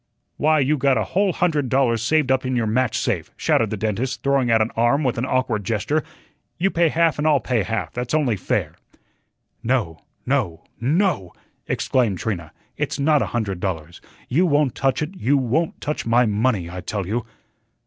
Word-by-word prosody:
"Why, 155 +1 +3
you 145 +3 +2
got 135 -1 +3
a 110 - +1
whole 195 - +1
hundred 155 -7 0
dollars 120 -4 +2
saved 145 +3 +2
up 130 0 +2
in 130 0 -1
your 120 -2 +1
match 120 +1 +1
safe," 100 -8 -1
shouted - - +2
the - - -3
dentist, 115 +4 -2
throwing 140 -3 +2
out 115 -1 +4
an 110 +1 +1
arm 120 +6 +2
with 125 -3 0
an 130 - -1
awkward 125 -5 0
gesture. 115 +10 0 0.6
"You 190 +3 +1
pay 170 -1 +3
half 165 -1 +2
and 150 - +1
I'll 150 -3 +4
pay 120 -1 0
half, 100 -5 -3
that's 125 +3 -2
only 140 -8 +2
fair." 90 - -2 0.9
"No, 110 -10 -1 0.3
no, 110 - -1 0.2
NO," 145 - 0 0.3
exclaimed 115 -8 +1
Trina. 85 -6 -4 0.3
"It's - - -2
not 150 0 +3
a - - 0
hundred 105 -6 -2
dollars. 85 -3 -4 0.3
You 170 +9 +2
won't 145 -4 +2
touch 135 +2 0
it; 155 +5 -5
you 140 -2 +2
won't 135 +6 0
touch 150 +1 -3
my 120 +2 +4
money, 105 -3 0
I 90 +1 -7
tell 100 +2 -3
you." 110 +6 -2
125 Hz, 190 wpm, -22 LUFS, 110-145 Hz, 0.9 s, out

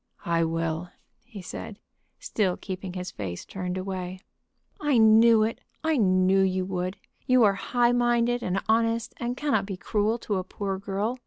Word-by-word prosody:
"I 170 -1 +2
will," 165 +1 -2 0.4
he 215 -6 -10
said, 200 +3 -7 0.4
still 190 -5 0
keeping 185 -1 -6
his 180 0 -5
face 90 -4 -6
turned 180 -1 -4
away. 185 -1 -4 0.6
"I 295 -4 +2
knew 220 0 +6
it; 225 +1 -2 0.2
I 315 -1 +2
knew 185 -2 +3
you 185 -1 +1
would. 185 +1 -3 0.3
You 255 -1 +5
are 205 -2 +5
high 240 +4 +1
minded 240 0 +2
and 190 -1 -1
honest, 230 0 +1
and 240 +1 -3
cannot 265 -10 0
be 195 -3 -5
cruel 215 +4 0
to 210 -4 -2
a 185 - -2
poor 195 0 -4
girl. 205 +5 -2
200 Hz, 165 wpm, -26 LUFS, 185-230 Hz, 0.6 s, knew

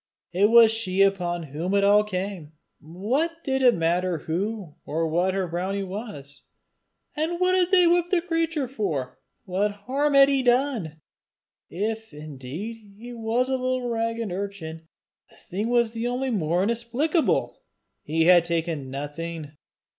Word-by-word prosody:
It 200 +4 +4
was 230 -1 +7
she 195 -4 +1
upon 175 -3 0
whom 175 +6 -1
it 200 - +3
all 205 +1 +5
came! 185 -5 -5 0.3
What 260 - -2
did 265 -1 0
it 250 -2 +5
matter 175 +1 0
who 185 +2 -3
or 165 +2 -1
what 175 +4 +1
her 190 -2 -1
brownie 185 +4 -2
was? 185 - -7 0.7
And 325 +3 -1
what 365 0 +3
had 365 -1 +3
they 365 -2 +5
whipped 345 0 +3
the 365 - +3
creature 330 -5 -1
for? 195 - -3 0.3
What 195 +3 0 0.2
harm 285 +3 +1
had 275 0 +8
he 275 -1 +2
done? 245 - 0 0.7
If 220 -1 -4
indeed 150 - -7 0.2
he 240 +3 -9
was 230 +2 0
a - - -3
little 255 -1 -1
ragged 230 -2 -2
urchin, 175 -4 -6 0.4
the - - -20
thing 205 +6 -4
was 235 -2 +2
only 250 +2 -1
the - - 0
more 175 0 +1
inexplicable! 235 - 0 0.4
He 160 +2 0
had 175 0 +6
taken 165 -5 -2
nothing! 150 +2 -6
205 Hz, 150 wpm, -25 LUFS, 170-250 Hz, 0.7 s, had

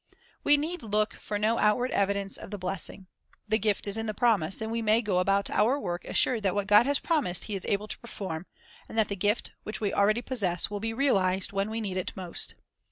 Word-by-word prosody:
We 290 - +5
need 330 +5 -3
look 215 -1 0
for 210 - -4
no 220 +3 +1
outward 245 +4 +2
evidence 200 0 0
of - - -7
the 205 - -5
bless 185 0 +2
ing. 195 - -12 0.4
The 220 +1 +1
gift 210 -1 0
is 200 +1 -2
in 225 0 -3
the 215 - -3
promise, 200 -7 +2
and 220 0 -4
we 230 0 -1
may 220 0 +3
go 195 -4 +1
about 195 +2 +1
our 245 +7 +2
work 175 -7 -4
assured 240 -4 +3
that 195 -2 0
what 205 -1 0
God 210 +5 +5
has 285 0 +3
promised 285 - +1
He 215 - -3
is 190 - -5
able 205 +1 0
to - - -6
perform, 190 -7 -6 0.4
and - - -8
that 220 -1 +2
the 200 - -2
gift, 205 +4 0
which 215 - -6
we 205 -2 -1
already 215 +4 +2
possess, 200 -9 -1
will 205 - -3
be 225 +2 -2
realized 195 -7 +1
when 195 +1 -1
we 220 +1 -3
need 195 -4 -3
it 185 - -3
most. 180 -3 -2
210 Hz, 235 wpm, -28 LUFS, 195-225 Hz, 0.4 s, We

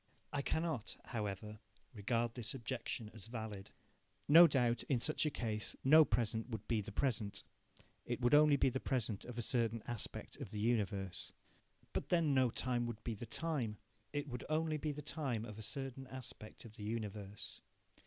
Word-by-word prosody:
I 145 - +1
cannot, 160 -5 -1
however, 105 -2 -4 0.3
regard 115 +2 0
this 120 0 -2
objection 115 -3 -3
as 110 -1 -8
valid. 110 -4 -5 0.6
No 165 +4 +10
doubt, 120 -5 +2
in 130 -4 +3
such 155 +4 +2
a - - +3
case, 110 -6 -2
no 155 +4 +8
present 115 -1 0
would 110 -3 -5
be 115 -3 +2
the 105 +2 -7
present 105 -4 0 0.6
it - - -2
would 120 +2 +3
only 150 0 +8
be 135 - +4
the 130 - -2
present 115 -7 -1
of 125 -1 -7
a 120 - -1
certain 115 -2 +1
aspect 120 -3 -5
of - - -6
the 105 - -5
universe. 100 -4 0 0.6
But - - -2
then 165 -5 +3
no 130 -2 +5
time 120 0 0
would 115 -2 -6
be 115 - -2
the 110 +2 -6
time 125 -6 -1 0.3
it 145 0 -2
would 125 -3 -5
only 155 0 +1
be 150 +1 -1
the 150 +1 -6
time 135 -8 -1
of 110 -2 -8
a - - -5
certain 135 +3 -4
aspect 125 -5 -8
of 110 0 -12
the 105 - -7
universe. 105 -2 -4
120 Hz, 180 wpm, -37 LUFS, 110-135 Hz, 0.6 s, No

